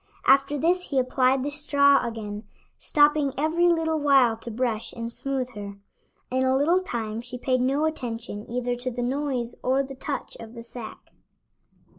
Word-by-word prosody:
After 275 Hz, +2 st, +4 dB
this 355 Hz, +5 st, +1 dB
he 275 Hz, -, -1 dB
applied 255 Hz, 0 st, +2 dB
the 290 Hz, -, -2 dB
straw 285 Hz, -1 st, +4 dB
again, 215 Hz, -2 st, -5 dB, 0.3 s
stopping 295 Hz, -2 st, +3 dB
every 320 Hz, +4 st, +2 dB
little 325 Hz, -2 st, +2 dB
while 270 Hz, -5 st, +4 dB
to 230 Hz, -, -8 dB
brush 230 Hz, -1 st, -2 dB
and 230 Hz, 0 st, -6 dB
smoothe 265 Hz, -2 st, -3 dB
her. 200 Hz, -1 st, -7 dB, 0.6 s
In 260 Hz, +1 st, +1 dB
a 260 Hz, 0 st, +3 dB
little 335 Hz, +7 st, +3 dB
time 225 Hz, -9 st, -4 dB
she 250 Hz, +1 st, -6 dB
paid 255 Hz, 0 st, 0 dB
no 275 Hz, +4 st, +1 dB
attention 230 Hz, -8 st, -4 dB
either 245 Hz, 0 st, -1 dB
to 250 Hz, +1 st, -2 dB
the 245 Hz, 0 st, -4 dB
noise 255 Hz, -2 st, -1 dB
or 265 Hz, +2 st, +2 dB
the 270 Hz, 0 st, -8 dB
touch 270 Hz, 0 st, -5 dB
of 230 Hz, +1 st, -10 dB
the 230 Hz, -, -8 dB
sack. 235 Hz, -1 st, -10 dB
260 Hz, 170 wpm, -25 LUFS, 235-285 Hz, 0.6 s, After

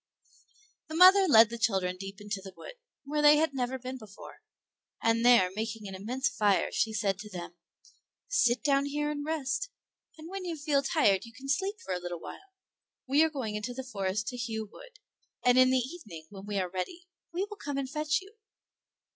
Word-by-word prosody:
The 315 Hz, -, -6 dB
mother 375 Hz, +3 st, +8 dB
led 230 Hz, -6 st, +7 dB
the 235 Hz, -, -5 dB
children 190 Hz, -5 st, +1 dB
deep 195 Hz, +1 st, -8 dB
into 205 Hz, -1 st, -5 dB
the 190 Hz, -1 st, -10 dB
wood, -, -, -9 dB, 0.3 s
where 295 Hz, +2 st, -1 dB
they 295 Hz, 0 st, +7 dB
had 315 Hz, -1 st, +1 dB
never 260 Hz, 0 st, -2 dB
been 255 Hz, +1 st, -7 dB
before, 210 Hz, -3 st, -13 dB, 0.6 s
and 230 Hz, 0 st, +2 dB
there 235 Hz, -7 st, +6 dB
making 220 Hz, -1 st, -4 dB
an 195 Hz, -, -7 dB
immense 245 Hz, +8 st, -2 dB
fire, 210 Hz, -6 st, +1 dB
she 220 Hz, -, 0 dB
said 200 Hz, -3 st, -1 dB
to 210 Hz, -, -8 dB
them, 175 Hz, -3 st, -7 dB, 0.7 s
"Sit -, -, +2 dB
down 280 Hz, -1 st, +3 dB
here 295 Hz, +1 st, -1 dB
and 290 Hz, -1 st, -4 dB
rest, 310 Hz, -, -2 dB, 0.5 s
and 315 Hz, +1 st, -10 dB
when 385 Hz, +1 st, -6 dB
you 340 Hz, -3 st, -4 dB
feel 285 Hz, -1 st, +1 dB
tired 210 Hz, -, +2 dB
you 230 Hz, -, -13 dB
can 265 Hz, +4 st, -11 dB
sleep 385 Hz, +9 st, 0 dB
for -, -, -2 dB
a 180 Hz, -, -2 dB
little 175 Hz, -1 st, -5 dB
while. 390 Hz, -, -11 dB, 0.5 s
We 280 Hz, +3 st, +4 dB
are 320 Hz, -, +3 dB
going 260 Hz, -8 st, -4 dB
into 210 Hz, +4 st, -4 dB
the 265 Hz, -, -5 dB
forest 210 Hz, -4 st, -2 dB
to 250 Hz, -, -7 dB
hew 225 Hz, -2 st, -3 dB
wood, -, -, -15 dB, 0.5 s
and 250 Hz, 0 st, +6 dB
in 255 Hz, 0 st, +6 dB
the 260 Hz, -, +3 dB
evening, 245 Hz, -, -6 dB
when 195 Hz, 0 st, -10 dB
we 205 Hz, -1 st, -2 dB
are 185 Hz, -2 st, 0 dB
ready, 185 Hz, -, -5 dB, 0.3 s
we 360 Hz, +4 st, -1 dB
will 420 Hz, 0 st, -9 dB
come 285 Hz, -6 st, -4 dB
and 275 Hz, -1 st, -2 dB
fetch 300 Hz, +4 st, 0 dB
you." 390 Hz, +3 st, -15 dB
255 Hz, 205 wpm, -29 LUFS, 210-300 Hz, 0.7 s, mother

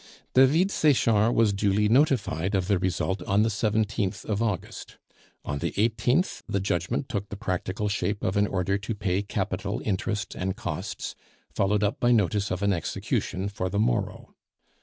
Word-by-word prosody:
David 150 Hz, +9 st, +5 dB
Sechard 115 Hz, -, +3 dB
was 110 Hz, -3 st, +4 dB
duly 100 Hz, +1 st, +2 dB
notified 105 Hz, -, +2 dB
of 95 Hz, -2 st, 0 dB
the 100 Hz, -3 st, +2 dB
result 95 Hz, +1 st, -1 dB
on 100 Hz, +2 st, +2 dB
the 115 Hz, -, +2 dB
17th 105 Hz, -2 st, -1 dB
of 105 Hz, 0 st, -1 dB
August. 105 Hz, -6 st, -3 dB, 0.5 s
On 70 Hz, -1 st, -3 dB
the -, -, -2 dB
18th 120 Hz, -, +1 dB
the 100 Hz, -, 0 dB
judgment 90 Hz, -, -1 dB
took 100 Hz, -2 st, -4 dB
the -, -, -5 dB
practical 95 Hz, +2 st, -2 dB
shape 100 Hz, 0 st, -1 dB
of 95 Hz, -, 0 dB
an 100 Hz, 0 st, +3 dB
order 95 Hz, +1 st, 0 dB
to 105 Hz, +2 st, -4 dB
pay 100 Hz, -2 st, 0 dB
capital, 100 Hz, -, -3 dB
interest, 100 Hz, -1 st, -2 dB
and 95 Hz, +1 st, -3 dB
costs, 100 Hz, -11 st, -5 dB, 0.4 s
followed 105 Hz, +1 st, +1 dB
up 105 Hz, +1 st, 0 dB
by 120 Hz, -, +3 dB
notice 100 Hz, -3 st, +2 dB
of 95 Hz, +2 st, -2 dB
an 100 Hz, -1 st, +3 dB
execution 95 Hz, +2 st, -2 dB
for 95 Hz, -2 st, -3 dB
the 100 Hz, -, -2 dB
morrow. -, -, -1 dB
100 Hz, 165 wpm, -26 LUFS, 95-110 Hz, 0.5 s, David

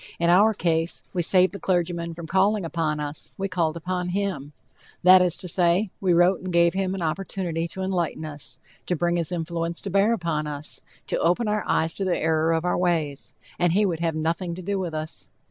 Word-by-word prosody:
In 170 Hz, 0 st, +2 dB
our 210 Hz, +4 st, +5 dB
case, 165 Hz, -1 st, 0 dB
we 180 Hz, -, 0 dB
saved 185 Hz, +2 st, +3 dB
the 200 Hz, -, -6 dB
clergyman 170 Hz, -2 st, -1 dB
from 170 Hz, 0 st, -7 dB
calling 195 Hz, +3 st, +2 dB
upon 155 Hz, -2 st, -1 dB
us, 145 Hz, 0 st, -4 dB
we 195 Hz, -, -1 dB
called 170 Hz, -4 st, -1 dB
upon 180 Hz, +1 st, -3 dB
him 180 Hz, -7 st, -2 dB, 0.5 s
that 185 Hz, +1 st, +8 dB
is 180 Hz, -2 st, +1 dB
to 180 Hz, -, -6 dB
say, 180 Hz, +3 st, +2 dB
we 185 Hz, -2 st, +2 dB
wrote 175 Hz, +2 st, +4 dB
and 185 Hz, 0 st, -5 dB
gave 170 Hz, 0 st, +4 dB
him 190 Hz, 0 st, -1 dB
an 185 Hz, -, -3 dB
opportunity 170 Hz, 0 st, -2 dB
to 190 Hz, +3 st, -6 dB
enlighten 175 Hz, -4 st, -1 dB
us, 145 Hz, -4 st, -4 dB, 0.3 s
to 180 Hz, -, +1 dB
bring 175 Hz, +1 st, 0 dB
his 170 Hz, 0 st, -2 dB
influence 170 Hz, 0 st, -3 dB
to 195 Hz, -, -4 dB
bear 200 Hz, +4 st, +3 dB
upon 165 Hz, -8 st, -1 dB
us, 150 Hz, 0 st, -6 dB, 0.2 s
to -, -, -1 dB
open 180 Hz, +7 st, +2 dB
our 210 Hz, -1 st, 0 dB
eyes 160 Hz, 0 st, +1 dB
to 195 Hz, -, -3 dB
the 185 Hz, -2 st, +1 dB
error 160 Hz, 0 st, +1 dB
of 165 Hz, +1 st, 0 dB
our 180 Hz, -, +1 dB
ways, 160 Hz, -6 st, -1 dB, 0.2 s
and 175 Hz, -1 st, +3 dB
he 205 Hz, +3 st, +3 dB
would 170 Hz, -5 st, -1 dB
have 165 Hz, -2 st, -1 dB
nothing 170 Hz, +2 st, -1 dB
to 185 Hz, -, -8 dB
do 200 Hz, +2 st, -1 dB
with 175 Hz, -4 st, -3 dB
us. 155 Hz, +1 st, -6 dB
175 Hz, 215 wpm, -25 LUFS, 165-185 Hz, 0.5 s, that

